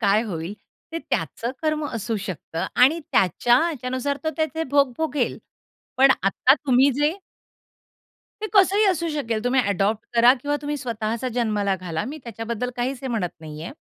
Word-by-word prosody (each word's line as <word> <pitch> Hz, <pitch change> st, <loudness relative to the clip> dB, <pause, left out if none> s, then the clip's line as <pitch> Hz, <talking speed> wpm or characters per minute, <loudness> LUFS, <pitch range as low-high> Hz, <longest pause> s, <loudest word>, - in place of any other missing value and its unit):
काय 205 Hz, +2 st, +3 dB
होईल, 175 Hz, -1 st, -5 dB, 0.4 s
ते 330 Hz, -, -2 dB
त्याचं 235 Hz, -6 st, -3 dB
कर्म 310 Hz, -1 st, 0 dB
असू 230 Hz, -1 st, -3 dB
शकतं 185 Hz, -4 st, -4 dB, 0.2 s
आणि 315 Hz, +6 st, +5 dB
त्याच्या 195 Hz, +6 st, +3 dB, 0.2 s
याच्यानुसार 260 Hz, 0 st, -2 dB
तो 315 Hz, -, +1 dB
त्याचे 315 Hz, 0 st, -1 dB
भोग 280 Hz, -3 st, +3 dB
भोगेल. 300 Hz, -5 st, -1 dB, 0.6 s
पण 270 Hz, +1 st, +6 dB
आता 195 Hz, +7 st, +4 dB
तुम्ही 270 Hz, -2 st, +3 dB
जे 295 Hz, +7 st, +1 dB, 1.2 s
ते -, -, 0 dB
कसंही 400 Hz, +1 st, +5 dB
असू 340 Hz, -3 st, +1 dB
शकेल. 235 Hz, -8 st, -2 dB
तुम्ही 255 Hz, +1 st, +3 dB
ॲडॉप्ट 205 Hz, 0 st, 0 dB
करा 235 Hz, +1 st, +7 dB
किंवा 290 Hz, +1 st, -1 dB
तुम्ही 295 Hz, 0 st, -2 dB
स्वतःचा 230 Hz, -1 st, -3 dB
जन्माला 210 Hz, -5 st, +1 dB
घाला. 175 Hz, 0 st, -4 dB
मी 290 Hz, +7 st, -6 dB
त्याच्याबद्दल 235 Hz, +2 st, -4 dB
काहीच 250 Hz, +2 st, -2 dB
हे 265 Hz, -, -3 dB
म्हणत 215 Hz, -8 st, -1 dB
नाहीये. 155 Hz, +7 st, -7 dB
245 Hz, 155 wpm, -23 LUFS, 215-290 Hz, 1.2 s, करा